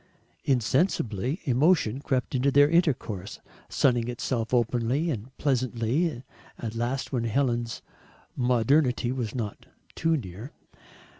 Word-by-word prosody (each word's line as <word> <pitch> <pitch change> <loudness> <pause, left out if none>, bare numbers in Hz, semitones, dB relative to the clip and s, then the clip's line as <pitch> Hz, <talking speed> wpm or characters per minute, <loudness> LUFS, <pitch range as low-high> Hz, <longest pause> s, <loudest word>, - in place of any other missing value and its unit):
Insensibly 130 - +1
emotion 135 -3 +2
crept 130 -3 -1
into 130 +2 +2
their 145 +1 +6
intercourse, 135 - 0 0.3
sunning 120 -4 +2
itself 120 -1 -2
openly 125 +6 +1
and 125 +1 -6
pleasantly 130 +2 0 0.3
at 110 -2 -5
last 120 +3 -2
when 120 -3 -1
Helen's 120 -1 -1 0.5
modernity 125 +1 +2
was 125 -4 -3
not 110 -5 -5 0.3
too 165 0 +1
near. 105 +2 -8
125 Hz, 105 wpm, -27 LUFS, 115-140 Hz, 0.5 s, their